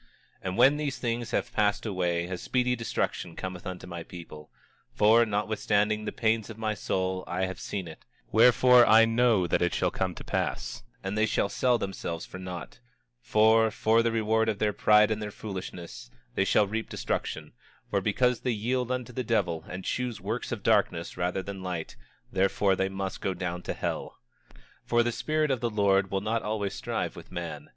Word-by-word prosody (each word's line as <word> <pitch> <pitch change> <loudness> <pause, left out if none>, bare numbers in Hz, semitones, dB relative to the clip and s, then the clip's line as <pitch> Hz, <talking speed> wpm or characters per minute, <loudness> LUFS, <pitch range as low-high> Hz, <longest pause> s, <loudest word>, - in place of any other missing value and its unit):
26:10 - - -32 0.4
And 90 +1 -3
when 140 +3 +6
these 145 -3 -2
things 120 -1 -2
have - - -2
passed 105 +1 +1
away 90 -4 0
a 90 +1 -4
speedy 125 +6 0
destruction 115 -2 -3
cometh 95 -1 -6
unto 90 -1 -6
my 85 -1 -6
people; 80 -3 -10 0.5
for, 115 +2 +5
notwithstanding 105 0 0
the - - -2
pains 110 -1 0
of 110 - -8
my 110 -1 -1
soul, 95 -2 -2
I 90 +2 -1
have 95 -1 -6
seen 95 -4 -4
it; 80 - -11 0.3
wherefore, 125 +2 +7
I 110 0 +7
know 115 -4 +3
that 85 - +1
it 85 -1 +1
shall - - +1
come - - -2
to - - -9
pass; - - -2 0.2
and 95 +1 -3
they 110 +1 +2
sell 120 +5 +1
themselves 85 -5 -4
for 95 - -9
naught; 90 0 -7 0.4
for, 110 -1 +4
for 110 +1 +3
the 115 0 +1
reward 110 0 +1
of 105 - -1
their 105 0 +1
pride 105 +1 +5
and 110 0 -1
their 105 - -3
foolishness 95 - -7 0.2
they 95 - +1
shall 105 +2 +4
reap 110 +3 -4
destruction; - - -3 0.4
for - - +1
because 125 -1 +2
they 125 - -2
yield 125 +3 -1
unto 125 -1 -3
the 130 - -2
devil 95 -9 0
and 90 +1 -6
choose 125 -3 -2
works - - -4
of - - -4
darkness 85 +1 +1
rather 90 +2 -1
than 100 -1 -7
light, 90 -3 -4 0.4
therefore 95 +1 +2
they 95 +1 0
must 95 0 -4
go 95 - -1
down 90 -1 -3
to - - -4
hell. - - -4 0.3
26:11 - - -22 0.3
For 120 0 +3
the 120 - 0
Spirit 155 +4 0
of 130 - 0
the 120 - 0
Lord 100 -2 +2
will 95 0 -1
not 110 +2 -1
always 105 -2 -2
strive - - -3
with - - -12
man. 85 -5 -6
105 Hz, 195 wpm, -28 LUFS, 95-115 Hz, 0.5 s, wherefore